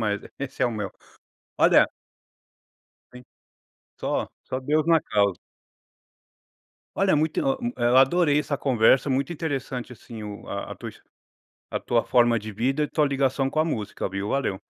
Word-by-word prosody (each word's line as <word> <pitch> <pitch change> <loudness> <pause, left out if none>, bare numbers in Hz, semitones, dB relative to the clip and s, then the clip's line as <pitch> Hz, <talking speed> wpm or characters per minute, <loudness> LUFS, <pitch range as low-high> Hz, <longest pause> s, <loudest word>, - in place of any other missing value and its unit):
mas 105 -2 0 0.2
esse 135 -1 -4
é - - +5
o 120 - -1
meu. 105 -4 -4 0.7
Olha - - +6 1.3
Sim, 125 - -11 0.8
só - - -1 0.2
só 130 - -4
Deus 150 +3 +1
na 165 -1 +5
causa. 100 -7 +1 1.6
Olha, 195 -1 +3
muito 155 +1 +1
o 270 -1 +1
um 240 - 0
eh, - - -1
eu 120 +2 +4
adorei 145 +2 +4
essa 145 -1 -1
conversa, 130 0 +3
muito 140 +6 0
interessante, 135 -6 -4
assim, 115 0 -10
o 105 -1 -8
a - - -5
tua - - -8
his - - -20 0.7
a - - -2
tua 115 -1 +1
forma 120 -2 +3
de 110 +1 -8
vida 130 +8 0
e 150 - -1
tua 150 - +1
ligação 135 -1 +1
com 155 - -1
a 160 - +3
música, 110 -12 -3
viu, 100 +2 -4
valeu. 115 -8 -1
130 Hz, 165 wpm, -25 LUFS, 110-150 Hz, 1.6 s, Olha